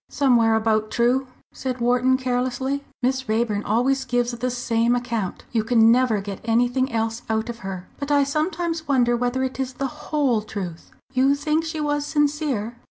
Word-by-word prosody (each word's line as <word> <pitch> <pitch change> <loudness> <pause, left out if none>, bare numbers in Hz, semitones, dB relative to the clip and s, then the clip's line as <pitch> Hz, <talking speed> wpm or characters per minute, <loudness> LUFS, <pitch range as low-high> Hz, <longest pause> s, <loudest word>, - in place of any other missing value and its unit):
"Somewhere 235 -5 +3
about 220 -1 +1
true," 250 +3 +1 0.3
said 255 -1 -4
Wharton, 250 +2 +3
carelessly. 255 +2 -1 0.2
"Miss 260 -1 0
Raeburn 220 -2 +1
always 260 +5 +1
gives 245 -1 0
the 240 +1 -2
same 240 -1 +1
account; 230 -6 -3
you 225 -3 +1
can 225 0 +5
never 240 -4 +3
get 195 -1 -7
anything 245 +3 +1
else 225 0 -1
out 220 +1 -1
of 235 -1 -6
her. 190 -2 -6
But 280 +1 -4
I 285 -1 +4
sometimes 320 +3 -2
wonder 245 -4 +3
whether 245 +2 0
it 260 0 -3
is 260 -1 -2
the 270 0 -6
whole 275 -8 +2
truth. 190 -6 -7 0.2
You 270 +2 +3
think 305 +2 0
she 320 -1 -4
was 290 -1 0
sincere?" 290 -7 0
245 Hz, 170 wpm, -23 LUFS, 230-270 Hz, 0.3 s, can